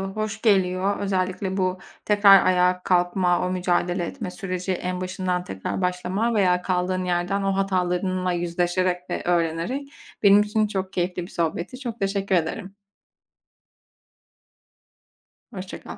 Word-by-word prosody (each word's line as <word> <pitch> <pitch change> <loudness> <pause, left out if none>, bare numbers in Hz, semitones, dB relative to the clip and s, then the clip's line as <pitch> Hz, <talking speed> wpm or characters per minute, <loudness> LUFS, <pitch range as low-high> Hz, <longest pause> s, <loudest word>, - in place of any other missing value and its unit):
hoş 215 0 -3
geliyor. 190 -2 +2
Özellikle 190 0 -1
bu 185 0 0 0.3
tekrar 205 -2 +6
ayağa 180 0 +3
kalkma, 175 0 +2
o - - -2
mücadele 180 -1 0
etme 180 - -6
süreci, 185 0 -4
en 180 0 -3
başından 185 -1 -2
tekrar 95 - -4
başlama 185 +6 -1
veya 180 -4 +3
kaldığın 185 0 -1
yerden 180 +3 0
o 195 0 0
hatalarınla 185 -1 0
yüzleşerek 175 +1 -1
ve - - -2
öğrenerek. 175 - -1 0.4
Benim 200 +1 +7
için 210 +1 +1
çok 190 -2 -4
keyifli 180 0 -1
bir 180 - -11
sohbetti. 170 +8 -3
Çok 235 -3 -6
teşekkür 195 -1 0
ederim. 190 +4 -2 2.8
Hoşça 190 -4 -8
kal. - - -9
185 Hz, 130 wpm, -24 LUFS, 180-195 Hz, 2.8 s, Benim